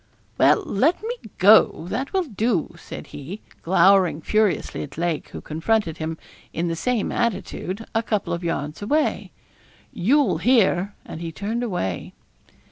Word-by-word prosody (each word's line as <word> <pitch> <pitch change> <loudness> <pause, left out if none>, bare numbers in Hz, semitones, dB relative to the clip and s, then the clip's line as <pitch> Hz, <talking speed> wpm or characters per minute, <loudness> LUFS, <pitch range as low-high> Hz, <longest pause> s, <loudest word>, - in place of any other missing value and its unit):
'Well, 420 - +5
let 310 - +1
me 470 +2 -2 0.2
go; 200 -4 +6
that 260 +7 -3
will 380 -1 +1
do,' 220 - -1
said - - -8
he, 160 +9 -7 0.2
glowering 190 -1 +4
furiously 215 +3 0
at 140 0 -8
Lake, 170 -2 -2
who - - -8
confronted 165 +1 -1
him, 160 0 -3 0.4
in 170 +1 -1
the 165 - -1
same 240 +4 -1
attitude, 225 -2 -2
a 225 - +2
couple 215 -3 -1
of 170 +1 -4
yards 150 -1 -3
away. 295 +9 0 0.6
'You'll 225 - +2
hear,' 200 -4 +3
and 160 - -8
he 165 -1 -4
turned 210 +8 -3
away. 180 - -3
195 Hz, 145 wpm, -23 LUFS, 165-230 Hz, 0.6 s, go